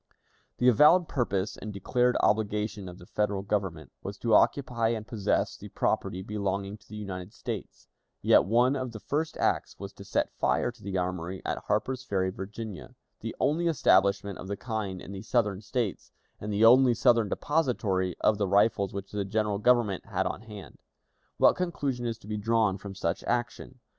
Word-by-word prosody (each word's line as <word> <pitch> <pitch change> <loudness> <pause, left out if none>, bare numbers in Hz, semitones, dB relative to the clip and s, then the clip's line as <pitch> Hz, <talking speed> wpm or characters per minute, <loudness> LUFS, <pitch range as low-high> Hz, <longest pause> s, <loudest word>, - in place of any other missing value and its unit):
The 125 - +2
avowed 150 - +6
purpose 105 -8 -1
and 110 - -6
declared 125 +5 +1
obligation 105 -2 0
of 90 - -10
the 90 - -13
Federal 100 0 -1
Government 95 -6 -2
was 100 0 -6
to 115 0 0
occupy 120 -1 +3
and 110 -2 -2
possess 110 -3 0
the - - -10
property 95 +1 -1
belonging 100 0 -3
to - - -24
the 105 - -9
United 95 -2 -6
States, 115 -6 -7 0.3
yet - - +5
one 120 +6 +3
of 130 -3 -4
the 110 - -7
first 150 - -2
acts - - 0
was - - -8
to - - -11
set - - -1
fire 120 - +1
to 120 -2 -22
the 100 -2 -3
armory 90 0 -3
at - - -2
Harper's 130 +5 -1
Ferry, 95 -6 0
Virginia, 100 0 -7 0.2
the - - -6
only 170 +4 +1
establishment 100 - +2
of 95 - -7
the 100 +1 -3
kind 105 -6 -4
in - - -9
the 95 -1 -6
Southern 105 -3 0
States, 110 -2 -3 0.3
and 105 - -5
the 105 +2 +4
only 125 +1 +7
Southern 115 -2 +3
depository 110 - 0
of 105 -1 +3
the 100 - +1
rifles 100 0 +2
which 100 0 -6
the 105 -1 -2
General 105 0 -1
Government 115 -4 +2
had - - 0
then - - +1
on - - -10
hand. 105 -4 -11 0.6
What - - +5
conclusion 140 -9 -2
is 115 -1 -3
to 110 - -16
be 105 0 -3
drawn 105 -2 +1
from 100 0 -8
such 85 -3 -2
action? 120 +1 -3
105 Hz, 185 wpm, -28 LUFS, 100-120 Hz, 0.6 s, only